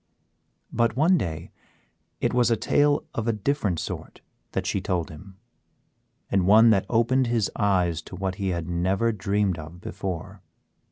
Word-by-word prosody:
But 115 Hz, -1 st, +1 dB
one 165 Hz, +6 st, +4 dB
day 80 Hz, -, -3 dB, 0.7 s
it -, -, 0 dB
was 125 Hz, -1 st, +3 dB
a 115 Hz, -, +2 dB
tale 145 Hz, +6 st, +2 dB
of 115 Hz, 0 st, -3 dB
a -, -, +3 dB
different 105 Hz, -, -1 dB
sort -, -, -7 dB, 0.3 s
that -, -, -2 dB
she -, -, -1 dB
told 90 Hz, -3 st, -2 dB
him, 95 Hz, +5 st, -13 dB, 0.9 s
and 95 Hz, -2 st, +2 dB
one 110 Hz, +3 st, +7 dB
that 95 Hz, -2 st, +2 dB
opened 120 Hz, +3 st, +2 dB
his 115 Hz, -3 st, 0 dB
eyes 90 Hz, -6 st, +1 dB
to -, -, -8 dB
what 95 Hz, 0 st, -2 dB
he 95 Hz, -, -1 dB
had 85 Hz, -2 st, -3 dB
never 95 Hz, +6 st, +1 dB
dreamed 100 Hz, -3 st, 0 dB
of 80 Hz, +3 st, -10 dB
before. 95 Hz, +1 st, -6 dB
100 Hz, 160 wpm, -25 LUFS, 90-115 Hz, 0.9 s, one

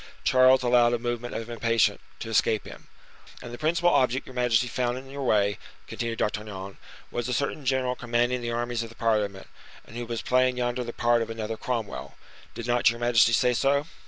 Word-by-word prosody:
Charles 130 Hz, 0 st, +5 dB
allowed 120 Hz, -1 st, +4 dB
a -, -, +2 dB
movement 120 Hz, 0 st, -4 dB
of 115 Hz, -, -4 dB
impatience 115 Hz, -2 st, +1 dB, 0.2 s
to 115 Hz, -, -5 dB
escape 110 Hz, -1 st, +2 dB
him. -, -, -12 dB, 0.5 s
"And 120 Hz, -, -9 dB
the 120 Hz, -, -8 dB
principal 170 Hz, +3 st, +2 dB
object 130 Hz, +1 st, +2 dB
your 130 Hz, -, -11 dB
majesty 125 Hz, -1 st, +2 dB
found 120 Hz, 0 st, -1 dB
in 135 Hz, +1 st, -10 dB
your 140 Hz, 0 st, -6 dB
way," 100 Hz, -5 st, +1 dB, 0.3 s
continued 115 Hz, -1 st, -4 dB
D'Artagnan, 100 Hz, -2 st, -4 dB, 0.3 s
"was 120 Hz, 0 st, -3 dB
a -, -, -1 dB
certain 140 Hz, +2 st, -2 dB
general 130 Hz, -1 st, +1 dB
commanding 120 Hz, +1 st, 0 dB
the 120 Hz, -, -3 dB
armies 120 Hz, 0 st, -2 dB
of 115 Hz, -, -6 dB
the 115 Hz, -, -15 dB
parliament, 105 Hz, -4 st, -1 dB, 0.4 s
and -, -, -14 dB
who 120 Hz, 0 st, -5 dB
was 115 Hz, -1 st, -4 dB
playing 130 Hz, 0 st, +2 dB
yonder 125 Hz, 0 st, -1 dB
the 120 Hz, -, -5 dB
part 120 Hz, 0 st, +2 dB
of 115 Hz, -, -3 dB
another 115 Hz, 0 st, -4 dB
Cromwell. 115 Hz, -2 st, -4 dB, 0.4 s
Did 115 Hz, -, -6 dB
not 120 Hz, -1 st, +3 dB
your 115 Hz, -, -3 dB
majesty 120 Hz, -1 st, +4 dB
say 125 Hz, +1 st, +3 dB
so?" 140 Hz, +4 st, +1 dB
120 Hz, 200 wpm, -26 LUFS, 115-125 Hz, 0.5 s, Charles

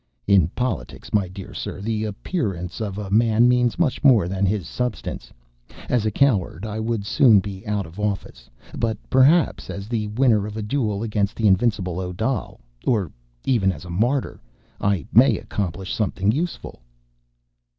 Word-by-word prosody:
"In 100 Hz, -2 st, +4 dB
politics, 125 Hz, +1 st, -4 dB
my 100 Hz, -3 st, +2 dB
dear 95 Hz, +1 st, -9 dB
sir, -, -, -5 dB
the 110 Hz, +1 st, -2 dB
appearance 100 Hz, -, -3 dB
of 100 Hz, -3 st, -3 dB
a 100 Hz, -2 st, -5 dB
man 115 Hz, +2 st, +4 dB
means 125 Hz, -1 st, +2 dB
much 160 Hz, -7 st, 0 dB
more 120 Hz, -11 st, +5 dB
than 95 Hz, +1 st, 0 dB
his 95 Hz, -4 st, -1 dB
substance. 125 Hz, +2 st, -4 dB, 0.6 s
As 115 Hz, -3 st, +1 dB
a -, -, +3 dB
coward, 105 Hz, -, +1 dB
I 110 Hz, 0 st, -4 dB
would 110 Hz, -2 st, -2 dB
soon 115 Hz, -1 st, +5 dB
be 95 Hz, -1 st, -6 dB
out 105 Hz, -2 st, -1 dB
of 80 Hz, +5 st, -12 dB
office. 100 Hz, -12 st, -4 dB, 0.3 s
But, 110 Hz, -2 st, -1 dB
perhaps, 145 Hz, +6 st, +4 dB
as 100 Hz, +1 st, -6 dB
the 110 Hz, -2 st, -2 dB
winner 110 Hz, -2 st, +2 dB
of 105 Hz, +1 st, -7 dB
a 110 Hz, -, -3 dB
duel 105 Hz, -3 st, -1 dB
against 105 Hz, -2 st, -1 dB
the 115 Hz, -, -1 dB
invincible 95 Hz, -3 st, +2 dB
Odal... 95 Hz, +8 st, -3 dB, 0.2 s
or 100 Hz, -, 0 dB, 0.3 s
even 105 Hz, -7 st, +2 dB
as 85 Hz, 0 st, -9 dB
a 85 Hz, -, -8 dB
martyr... 120 Hz, +9 st, 0 dB, 0.4 s
I 100 Hz, -8 st, 0 dB
may -, -, +6 dB
accomplish 95 Hz, -1 st, -4 dB
something 100 Hz, -1 st, 0 dB
useful." 155 Hz, -, -4 dB
105 Hz, 160 wpm, -23 LUFS, 95-115 Hz, 0.6 s, may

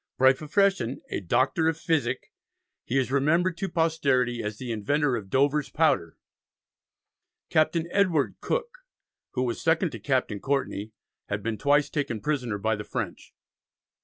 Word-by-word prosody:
By 130 Hz, +1 st, +6 dB
profession 155 Hz, -, +1 dB
"a -, -, -1 dB
Doctor 130 Hz, -, +1 dB
of 160 Hz, -1 st, +1 dB
Physick," 145 Hz, -7 st, -1 dB, 0.5 s
he 130 Hz, -, 0 dB
is 130 Hz, -1 st, +1 dB
remembered 165 Hz, +6 st, +2 dB
to 195 Hz, +1 st, -2 dB
posterity 140 Hz, -8 st, +1 dB
as 105 Hz, 0 st, -4 dB
the 125 Hz, 0 st, -5 dB
inventor 135 Hz, +6 st, +1 dB
of 100 Hz, -4 st, -6 dB
"Dover's 140 Hz, +3 st, +2 dB
Powder"; 100 Hz, -, +1 dB, 1.3 s
Captain 160 Hz, +1 st, +2 dB
Edward 180 Hz, -7 st, +2 dB
Cooke, -, -, -2 dB, 0.5 s
who 125 Hz, -, 0 dB
was 120 Hz, -2 st, -2 dB
second 165 Hz, +1 st, +2 dB
to -, -, -7 dB
Captain 130 Hz, -7 st, 0 dB
Courtney, 110 Hz, -5 st, -2 dB, 0.4 s
had 100 Hz, 0 st, -2 dB
been 115 Hz, -2 st, -2 dB
twice 145 Hz, 0 st, +3 dB
taken 135 Hz, -7 st, -2 dB
prisoner 125 Hz, -3 st, -1 dB
by 110 Hz, +2 st, 0 dB
the 105 Hz, -, -6 dB
French. -, -, -5 dB
140 Hz, 145 wpm, -27 LUFS, 120-160 Hz, 1.3 s, By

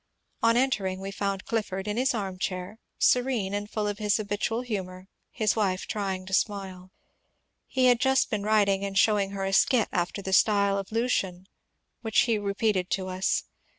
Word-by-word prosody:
On 230 Hz, +1 st, +4 dB
entering 200 Hz, -8 st, 0 dB
we 195 Hz, +1 st, -5 dB
found 195 Hz, -1 st, -3 dB
Clifford 210 Hz, -5 st, -3 dB
in 210 Hz, -, -1 dB
his 255 Hz, +1 st, +1 dB
armchair, 190 Hz, 0 st, -4 dB, 0.2 s
serene 245 Hz, -6 st, +2 dB
and 205 Hz, 0 st, -3 dB
full 215 Hz, -1 st, -2 dB
of 205 Hz, 0 st, -3 dB
his 210 Hz, -1 st, +2 dB
habitual 215 Hz, +2 st, -2 dB
humour, 190 Hz, -6 st, -5 dB, 0.3 s
hi8 215 Hz, -2 st, +2 dB
wife 195 Hz, -4 st, 0 dB
trying 195 Hz, -3 st, -3 dB
to 190 Hz, -, -8 dB
8mile. 190 Hz, -2 st, -1 dB, 0.8 s
He 260 Hz, -1 st, +1 dB
had 245 Hz, -2 st, +5 dB
just 265 Hz, 0 st, +2 dB
been 210 Hz, -3 st, -1 dB
writing 200 Hz, -2 st, +2 dB
and 195 Hz, -1 st, -3 dB
showing 205 Hz, -2 st, +3 dB
her 195 Hz, -1 st, -4 dB
a 195 Hz, -, -2 dB
skit 230 Hz, +3 st, +3 dB
after 175 Hz, +3 st, -2 dB
the 190 Hz, -, -3 dB
style 200 Hz, -1 st, +3 dB
of 195 Hz, -, -7 dB
Lucian 195 Hz, -6 st, -1 dB, 0.6 s
which 220 Hz, -2 st, +2 dB
he 230 Hz, -3 st, +1 dB
re 200 Hz, -1 st, -3 dB
peated 195 Hz, -4 st, 0 dB
to 190 Hz, -1 st, -2 dB
us. 185 Hz, +1 st, 0 dB
200 Hz, 180 wpm, -27 LUFS, 190-220 Hz, 0.8 s, had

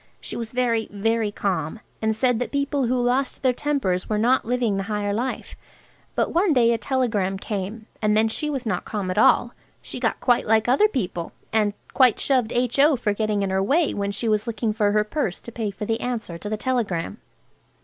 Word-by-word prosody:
She -, -, -6 dB
was 230 Hz, -1 st, -5 dB
very, 235 Hz, -3 st, 0 dB
very 220 Hz, +1 st, 0 dB
calm, 195 Hz, -1 st, -2 dB, 0.2 s
and 220 Hz, 0 st, +1 dB
said 245 Hz, 0 st, +1 dB
that 245 Hz, -, -3 dB
people 280 Hz, -2 st, 0 dB
who 250 Hz, +1 st, +1 dB
lost 250 Hz, +3 st, 0 dB
their 255 Hz, -1 st, +4 dB
tempers 245 Hz, -10 st, -1 dB
were 215 Hz, -, +1 dB
not 245 Hz, +5 st, +2 dB
living 235 Hz, -4 st, 0 dB
the 195 Hz, -, -1 dB
higher 205 Hz, -1 st, -1 dB
life. 245 Hz, +5 st, -3 dB, 0.6 s
But -, -, 0 dB
one 350 Hz, 0 st, +3 dB
day 235 Hz, -3 st, +4 dB
a 230 Hz, -, -1 dB
telegram 220 Hz, -8 st, 0 dB
came, 205 Hz, +2 st, -5 dB, 0.2 s
and 210 Hz, 0 st, +2 dB
then 220 Hz, +1 st, +4 dB
she 300 Hz, +7 st, -1 dB
was 270 Hz, -4 st, -3 dB
not 185 Hz, -5 st, -1 dB
calm 200 Hz, -4 st, -3 dB
at -, -, 0 dB
all. -, -, +4 dB, 0.3 s
She -, -, -7 dB
got -, -, 0 dB
quite 245 Hz, -2 st, +2 dB
like 220 Hz, +1 st, +3 dB
other 270 Hz, +12 st, +5 dB
people, 180 Hz, -, -3 dB, 0.2 s
and 210 Hz, -2 st, +2 dB, 0.2 s
quite 255 Hz, -5 st, +4 dB
shoved 255 Hz, -5 st, +2 dB
H.O. 275 Hz, +5 st, +3 dB
for 225 Hz, -4 st, 0 dB
getting 210 Hz, -1 st, 0 dB
in 195 Hz, -, -1 dB
her 190 Hz, 0 st, +1 dB
way 290 Hz, -, +2 dB
when 200 Hz, 0 st, -2 dB
she 205 Hz, +3 st, -2 dB
was 215 Hz, 0 st, +1 dB
looking 225 Hz, -1 st, -1 dB
for 210 Hz, -2 st, +2 dB
her 210 Hz, 0 st, +3 dB
purse 215 Hz, -, -2 dB
to 235 Hz, -, -9 dB
pay 225 Hz, -2 st, -3 dB
for 205 Hz, +1 st, -6 dB
the 225 Hz, +2 st, -1 dB
answer 235 Hz, -8 st, -3 dB
to 205 Hz, -, -5 dB
the 215 Hz, -, -2 dB
telegram. 215 Hz, -6 st, -2 dB
225 Hz, 210 wpm, -23 LUFS, 205-250 Hz, 0.6 s, other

